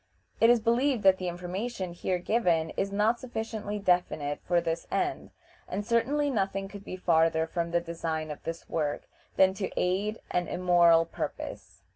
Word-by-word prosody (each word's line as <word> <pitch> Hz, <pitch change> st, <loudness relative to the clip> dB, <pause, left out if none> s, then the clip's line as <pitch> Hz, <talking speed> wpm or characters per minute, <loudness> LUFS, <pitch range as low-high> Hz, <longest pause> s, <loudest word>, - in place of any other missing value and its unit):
It 230 Hz, -, +6 dB
is 240 Hz, -1 st, +6 dB
believed 240 Hz, +2 st, +1 dB
that 190 Hz, -1 st, +5 dB
the 185 Hz, -, -3 dB
information 180 Hz, +2 st, -4 dB
here 180 Hz, +1 st, -1 dB
given 175 Hz, -5 st, +1 dB
is 195 Hz, -, -2 dB
not 215 Hz, +4 st, +2 dB
sufficiently 220 Hz, -4 st, -4 dB
definite 180 Hz, -7 st, 0 dB
for 175 Hz, -1 st, +3 dB
this 165 Hz, 0 st, -3 dB
end, 365 Hz, -1 st, -1 dB, 0.4 s
and, 200 Hz, +3 st, -3 dB
certainly, 265 Hz, +6 st, +1 dB
nothing 195 Hz, -3 st, -1 dB
could 200 Hz, 0 st, -10 dB
be 185 Hz, -, -6 dB
farther 165 Hz, -2 st, +3 dB
from 170 Hz, +1 st, -2 dB
the 170 Hz, 0 st, +1 dB
design 165 Hz, -2 st, -3 dB
of 150 Hz, -, -8 dB
this 165 Hz, 0 st, -6 dB
work 150 Hz, -3 st, -2 dB, 0.3 s
than 190 Hz, 0 st, +5 dB
to 195 Hz, 0 st, -3 dB
aid 200 Hz, +4 st, 0 dB
an 175 Hz, -1 st, 0 dB
immoral 170 Hz, -2 st, +4 dB
purpose. 165 Hz, -, -6 dB
185 Hz, 165 wpm, -28 LUFS, 170-215 Hz, 0.4 s, It